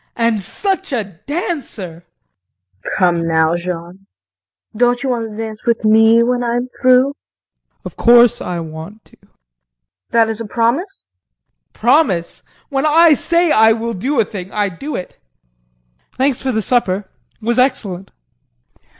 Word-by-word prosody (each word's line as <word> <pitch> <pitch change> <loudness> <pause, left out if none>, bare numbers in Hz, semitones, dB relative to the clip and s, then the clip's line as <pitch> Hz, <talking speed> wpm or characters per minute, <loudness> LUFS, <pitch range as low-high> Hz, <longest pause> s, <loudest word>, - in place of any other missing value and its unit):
And 230 -3 +1
such 385 - -3
a 240 -5 0 0.2
dancer! 255 - -5 0.8
KRISTIN. - - -5
Come 170 -2 +2
now, 160 0 +2
Jean, 175 +2 -6 0.7
don't 245 +3 +1
you 270 - -1
want 230 -3 -2
to 210 - -10
dance 220 -1 -5
with 230 -1 +1
me 225 +2 +5
when 245 +1 0
I'm 240 +1 -2
through? 255 +1 +4
JEAN. - - -53
Of - - -8
course 240 -1 +5
I 175 -1 -4
want 160 +7 -9
to. - - -22
KRISTIN. - - -31 0.7
That 230 -1 +3
is 225 0 -4
a - - -4
promise? 245 - -1
JEAN. - - -36
Promise! 235 - +1 0.3
When 275 +1 0
I 325 +1 +6
say 340 +3 +1
I 220 0 +5
will 230 +1 -3
do 255 +8 -2
a 225 - +3
thing 190 -2 -8
I 205 -1 0
do 275 - -7
it! 180 - -7 0.9
Thanks 265 0 0
for 265 - -1
the 220 -2 -1
supper 200 -4 0 0.3
it 220 - -13
was 240 +2 +1
excellent. 195 -8 -1
230 Hz, 155 wpm, -17 LUFS, 185-255 Hz, 0.9 s, I